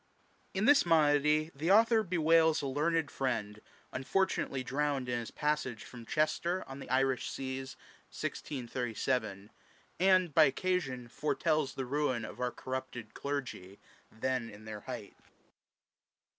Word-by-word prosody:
In 195 Hz, +3 st, +1 dB
this 285 Hz, +1 st, +6 dB
Monody 155 Hz, -1 st, +3 dB
the 155 Hz, +5 st, -2 dB
Author 225 Hz, +2 st, +6 dB
bewails 165 Hz, -4 st, +3 dB
a -, -, -1 dB
learned 155 Hz, +3 st, 0 dB
Friend, 110 Hz, -5 st, -2 dB, 0.3 s
unfortunately 135 Hz, -2 st, 0 dB
drowned 135 Hz, 0 st, -1 dB
in 120 Hz, -1 st, 0 dB
his 115 Hz, -, -6 dB
passage 150 Hz, -6 st, -1 dB
from 120 Hz, -2 st, -11 dB
Chester 170 Hz, +5 st, 0 dB
on 135 Hz, +1 st, -8 dB
the -, -, -9 dB
Irish 130 Hz, -2 st, +1 dB
Seas, 130 Hz, 0 st, -5 dB, 0.3 s
1637; 120 Hz, -5 st, -3 dB, 0.5 s
and, 185 Hz, -3 st, +4 dB
by 160 Hz, +1 st, +7 dB
occasion, 135 Hz, -6 st, -1 dB
foretells 150 Hz, +2 st, 0 dB
the 135 Hz, -, -3 dB
ruin 130 Hz, -4 st, 0 dB
of -, -, -9 dB
our 125 Hz, -1 st, 0 dB
corrupted 130 Hz, -3 st, -6 dB
Clergy, 125 Hz, -9 st, -5 dB, 0.3 s
then 120 Hz, +1 st, -2 dB
in 105 Hz, +1 st, -13 dB
their 110 Hz, -1 st, -6 dB
height. -, -, -7 dB
135 Hz, 130 wpm, -32 LUFS, 125-160 Hz, 0.5 s, by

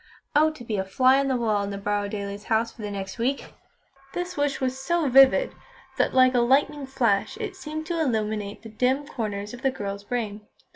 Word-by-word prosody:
"Oh! 310 Hz, +2 st, +5 dB
to 290 Hz, -6 st, -11 dB
be 220 Hz, -3 st, -3 dB
a 190 Hz, -, 0 dB
fly 255 Hz, +8 st, +4 dB
on 275 Hz, -, +1 dB
the 260 Hz, -2 st, +1 dB
wall 215 Hz, -4 st, +1 dB
in 200 Hz, -, -3 dB
the 200 Hz, -, -4 dB
Borrowdailes' 205 Hz, 0 st, -3 dB
house 225 Hz, 0 st, +1 dB
for -, -, -13 dB
the 210 Hz, -, -4 dB
next 195 Hz, +2 st, -6 dB
week!" 265 Hz, +4 st, -1 dB, 0.6 s
This 355 Hz, +1 st, -3 dB
wish 285 Hz, -1 st, 0 dB
was 260 Hz, 0 st, -2 dB
so 330 Hz, +3 st, 0 dB
vivid, 270 Hz, -, +6 dB, 0.5 s
that -, -, +3 dB
like 255 Hz, 0 st, +5 dB
a 245 Hz, -, +3 dB
lightning 275 Hz, +3 st, +2 dB
flash 240 Hz, -, +1 dB
it 425 Hz, -4 st, -5 dB
seemed 310 Hz, -3 st, -6 dB
to 335 Hz, 0 st, -1 dB
illumine 215 Hz, -6 st, -1 dB
the 225 Hz, -, -9 dB
dim 255 Hz, +6 st, 0 dB
corners 210 Hz, -6 st, -4 dB
of 245 Hz, -, -9 dB
the 270 Hz, -, +2 dB
girl's 200 Hz, -5 st, -5 dB
brain. 210 Hz, -3 st, -4 dB
245 Hz, 205 wpm, -25 LUFS, 205-275 Hz, 0.6 s, vivid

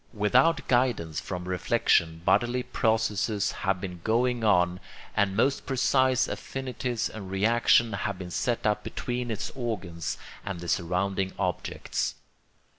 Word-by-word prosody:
Without 125 Hz, +10 st, +3 dB
guidance 120 Hz, -11 st, +1 dB
from 90 Hz, -1 st, -5 dB
reflection 85 Hz, -2 st, +1 dB
bodily 120 Hz, +1 st, +2 dB
processes 110 Hz, -3 st, 0 dB
have 95 Hz, -2 st, -1 dB
been 90 Hz, -2 st, -6 dB
going 120 Hz, +1 st, +1 dB
on, 90 Hz, -4 st, +3 dB, 0.4 s
and 100 Hz, -2 st, +2 dB
most 135 Hz, +4 st, +1 dB
precise 130 Hz, -1 st, +3 dB
affinities 125 Hz, -3 st, -3 dB
and 100 Hz, -4 st, -8 dB
reactions 115 Hz, +3 st, +3 dB
have -, -, -2 dB
been 90 Hz, -1 st, -7 dB
set 120 Hz, +6 st, -1 dB
up 105 Hz, 0 st, +1 dB
between 125 Hz, 0 st, -3 dB
its 110 Hz, -1 st, -3 dB
organs 95 Hz, -, -4 dB, 0.3 s
and 95 Hz, -3 st, -4 dB
the 85 Hz, -, -7 dB
surrounding 95 Hz, +3 st, 0 dB
objects. 90 Hz, -1 st, -2 dB
105 Hz, 125 wpm, -27 LUFS, 90-120 Hz, 0.4 s, Without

